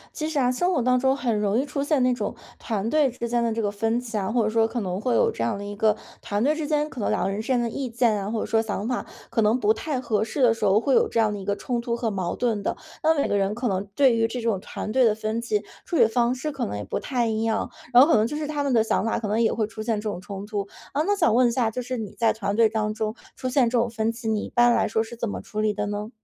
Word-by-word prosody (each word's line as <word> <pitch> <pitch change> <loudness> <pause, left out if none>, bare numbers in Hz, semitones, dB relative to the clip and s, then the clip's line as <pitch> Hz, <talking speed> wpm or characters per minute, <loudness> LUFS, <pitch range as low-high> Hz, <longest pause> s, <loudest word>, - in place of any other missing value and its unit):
其 310 0 -2
实 315 - -3
啊， 250 -2 +3
生 355 +9 +1
活 345 - +1
当 250 0 +3
中 265 +1 +2
很 235 -6 0
容 210 +3 +1
易 275 - 0
出 280 -1 -3
现 285 -3 +2
那 250 0 +3
种 215 -4 -3 0.2
团 215 -2 -2
队 300 -4 +4
之 235 -1 -5
间 240 0 +1
的 230 - +1
这 225 0 -2
个 205 - 0
分 225 +3 0
歧 240 -2 -7
啊， 195 -1 -1
或 235 0 +2
者 215 - +1
说 225 0 +3
可 240 +2 -3
能 185 0 -3
会 250 - +1
有 470 -2 +3
这 - - -3
样 225 -4 -1
的 200 - -6
一 205 0 -6
个 215 +1 +2 0.2
团 205 +2 -1
队 290 +4 +3
之 310 -1 -3
间， 300 -1 +1
可 265 - -9
能 - - 0
两 - - +1
个 195 - 0
人 200 +2 -3
之 220 - -9
间 255 -2 +2
的 235 - 0
意 255 +3 -4
见 235 -1 +2
啊， 200 - -4
或 225 0 -2
者 - - -2
说 225 0 +2
想 215 -1 -3
法 250 -1 -1 0.3
可 230 - +2
能 220 +4 +3
不 215 -2 +3
太 270 +4 -3
合 220 -4 0
适 255 +5 -1
的 235 -2 +6
时 225 - -7
候 195 +2 +5
会 270 +4 +1
有 - - +4
这 - - 0
样 215 -2 +2
的 205 - -5
一 - - -7
个 200 +1 -1
冲 240 +3 -2
突 235 0 -2
和 235 -2 -2
矛 185 -3 -2
盾 230 -4 0
的。 - - -2 0.2
那 320 0 +3
每 - - +1
个 - - 0
人 200 +1 +1
可 240 +2 -2
能 190 -2 0
对 265 -4 +5
于 225 0 +2
这 245 +2 -5
种 225 -4 0
团 215 - -6
队 260 +3 +4
的 220 -3 +4
分 220 +1 -2
歧， 420 - -1 0.2
处 345 - -4
理 300 - +6
方 240 +2 +1
式 300 +4 -3
可 275 -3 -3
能 105 - -4
也 105 - -4
不 100 - -3
太 245 -4 -1
一 220 -1 -1
样， 225 0 -1 0.2
然 245 0 +8
后 - - +4
可 325 - +4
能 215 +1 +3
就 295 - -4
是 305 - -3
他 295 -1 -2
们 280 - 0
的 230 -3 +4
想 220 - 0
法 225 - 0
可 220 - -3
能 215 +3 +1
也 225 - +3
会 220 -1 0
出 215 0 -8
现 220 -1 -1
这 215 - -5
种 180 -4 -4
冲 200 0 -7
突。 205 -2 -3 0.3
呃， 290 +2 +1
那 410 0 +2
想 325 - +3
问 245 +1 +5
一 - - +1
下， 235 -2 +1
就 250 +3 -3
是 250 +1 -4
你 215 -3 -5
在 230 - +2
团 200 -2 -2
队 225 0 +5
当 215 -1 -1
中 215 0 -3 0.2
出 255 - -3
现 255 -1 +3
这 235 0 +1
种 235 - +1
分 225 0 -1
歧， 230 0 -7
你 215 -1 0
一 - - -6
般 240 0 +5
来 - - +2
说 220 +1 +1
是 225 +1 -6
怎 235 0 -3
么 205 - -4
处 215 - -6
理 215 0 +1
的 205 0 -2
呢？ 205 +1 -4
230 Hz, 360 characters per minute, -25 LUFS, 215-250 Hz, 0.3 s, 然